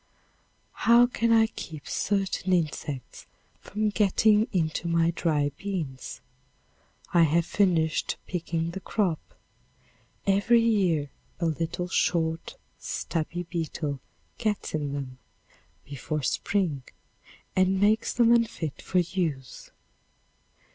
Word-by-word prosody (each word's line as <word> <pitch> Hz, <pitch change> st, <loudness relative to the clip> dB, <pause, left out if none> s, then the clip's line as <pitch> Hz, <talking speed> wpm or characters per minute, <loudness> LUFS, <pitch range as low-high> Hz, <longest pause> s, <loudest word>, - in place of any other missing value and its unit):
How 235 Hz, +1 st, +8 dB
can 230 Hz, -1 st, 0 dB
I 225 Hz, -1 st, +6 dB
keep 160 Hz, -8 st, -8 dB
certain 195 Hz, -2 st, 0 dB
insects 150 Hz, -6 st, -3 dB, 0.3 s
from 215 Hz, +1 st, -1 dB
getting 210 Hz, +1 st, +3 dB
into 165 Hz, -1 st, -1 dB
my 170 Hz, 0 st, +2 dB
dry 150 Hz, -3 st, 0 dB
beans? 165 Hz, -10 st, -5 dB, 0.9 s
I 175 Hz, -, +6 dB
have 165 Hz, +1 st, +3 dB
finished 170 Hz, -5 st, +1 dB
picking 165 Hz, -2 st, -2 dB
the 190 Hz, -, -5 dB
crop. 185 Hz, -5 st, 0 dB, 1.1 s
Every 205 Hz, +4 st, +4 dB
year 185 Hz, -11 st, +2 dB, 0.3 s
a 170 Hz, -, 0 dB
little, 165 Hz, +2 st, -2 dB
short, 165 Hz, -, 0 dB, 0.2 s
stubby 170 Hz, +1 st, -3 dB
beetle 160 Hz, -4 st, -3 dB, 0.4 s
gets 215 Hz, -3 st, -1 dB
in 145 Hz, -2 st, -2 dB
them 130 Hz, -2 st, -6 dB, 0.7 s
before 145 Hz, +2 st, -4 dB
spring 170 Hz, -1 st, 0 dB, 0.7 s
and 185 Hz, 0 st, +3 dB
makes 215 Hz, +3 st, +3 dB
them 235 Hz, -1 st, +4 dB
unfit 175 Hz, -, 0 dB
for 185 Hz, -, -2 dB
use. 160 Hz, -8 st, -2 dB
170 Hz, 105 wpm, -27 LUFS, 155-200 Hz, 1.1 s, How